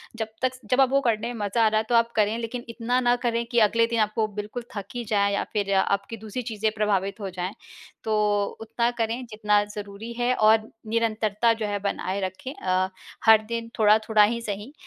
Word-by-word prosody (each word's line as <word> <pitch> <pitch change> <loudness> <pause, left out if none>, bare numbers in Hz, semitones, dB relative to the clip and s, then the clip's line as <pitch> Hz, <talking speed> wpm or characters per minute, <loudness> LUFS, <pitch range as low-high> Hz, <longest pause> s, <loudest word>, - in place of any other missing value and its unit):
जब 220 -1 -3
तक 255 0 +1
स - - -16
जब 255 +2 +5
आप 265 - +4
वो 275 +1 +3
करने 230 -3 0
में 230 - -8
मज़ा 225 +3 +1
आ - - +6
रहा 215 0 +2
है - - -1
तो 240 - +3
आप 230 0 +3
करें 215 +1 +2
लेकिन 235 +1 -5
इतना 240 +2 0
ना 245 -1 +3
करें 235 0 0
कि 240 0 +2
अगले 230 +1 +4
दिन 230 -1 -1
आपको 215 +1 +1
बिल्कुल 210 +4 -5
थक 200 -2 -4
ही 240 - -3
जाए 200 -1 +1
या 200 - 0
फ़िर 200 -2 0
आपकी 200 +3 0
दूसरी 220 +3 -5
चीज़ें 215 0 0
प्रभावित 200 -1 0
हो 200 -2 -4
जाएँ 185 +1 -4 0.5
तो 220 -1 0 0.5
उतना 235 +2 0
करें 230 +3 -2
जितना 210 -1 +2
ज़रूरी 205 +2 -7
है 245 +1 +2
और 220 0 +4 0.2
निरंतरता 225 0 +1
जो 225 -1 -3
है 205 0 -2
बनाए 200 -1 -2
रखें 190 +8 -5
अ, 185 0 0 0.4
हर 220 -1 +8
दिन 230 0 -4
थोड़ा-थोड़ा 215 0 +5
ही 235 +3 +1
सही 210 +4 -5
220 Hz, 215 wpm, -25 LUFS, 205-235 Hz, 0.5 s, हर